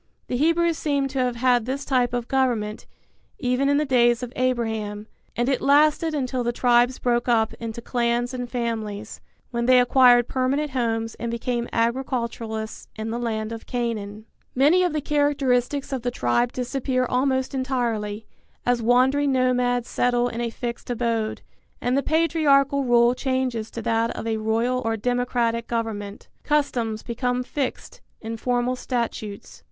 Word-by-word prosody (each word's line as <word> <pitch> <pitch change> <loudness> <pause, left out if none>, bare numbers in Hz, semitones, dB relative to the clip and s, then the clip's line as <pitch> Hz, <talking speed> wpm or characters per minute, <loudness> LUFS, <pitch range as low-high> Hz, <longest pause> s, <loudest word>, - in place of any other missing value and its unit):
The - - -1
Hebrews 335 +3 +2
seem 280 -2 0
to 270 0 -3
have 250 -1 0
had 245 -1 +2
this 270 +3 -3
type 250 -3 +1
of 245 -1 -3
government, 235 -5 -1 0.5
even 255 +1 +1
in 285 - +3
the 300 - +1
days 240 -2 +3
of 245 0 -6
Abraham; 220 -5 -1 0.3
and 240 +1 0
it 265 -2 +1
lasted 305 +3 +3
until 255 -3 -1
the 240 - 0
tribes 245 +1 +3
broke 240 0 0
up 225 -2 +2
into 230 0 -6
clans 240 0 0
and 245 -1 -4
families, 220 -4 -4 0.3
when 235 0 -1
they 255 0 +7
acquired 245 -1 +5
permanent 270 +3 0
homes 225 -3 -1
and 235 - -3
became 235 +1 -2
agriculturists 230 -2 -2
in 220 +1 -4
the 235 - -2
land 220 -2 -2
of 225 -1 -8
Canaan. 220 -4 -3 0.3
Many 295 +8 +5
of 360 -1 +2
the 305 0 -2
characteristics 280 -2 0
of 260 - -2
the 245 - -1
tribe 235 - 0
disappear 255 0 -1
almost 260 +1 0
entirely, 230 -5 -2 0.4
as 245 -1 +2
wandering 260 +5 +3
nomads 250 -2 +1
settle 245 0 +1
in 235 0 -4
a 235 - -1
fixed 235 +1 -6
abode, 230 -2 -1 0.4
and 250 +1 0
the 275 - +3
patriarchal 285 -4 +2
rule 240 -1 +4
changes 255 -4 -2
to 230 - -7
that 230 +1 +1
of - - -5
a 225 -1 -1
royal 230 +4 0
or 225 0 -1
democratic 240 0 0
government. 215 -3 -4 0.2
Customs 245 -7 0
become 250 +1 -1
fixed 265 +1 -4 0.2
in 225 0 -5
formal 245 +2 0
statutes. 235 -5 -4
245 Hz, 160 wpm, -24 LUFS, 230-260 Hz, 0.5 s, they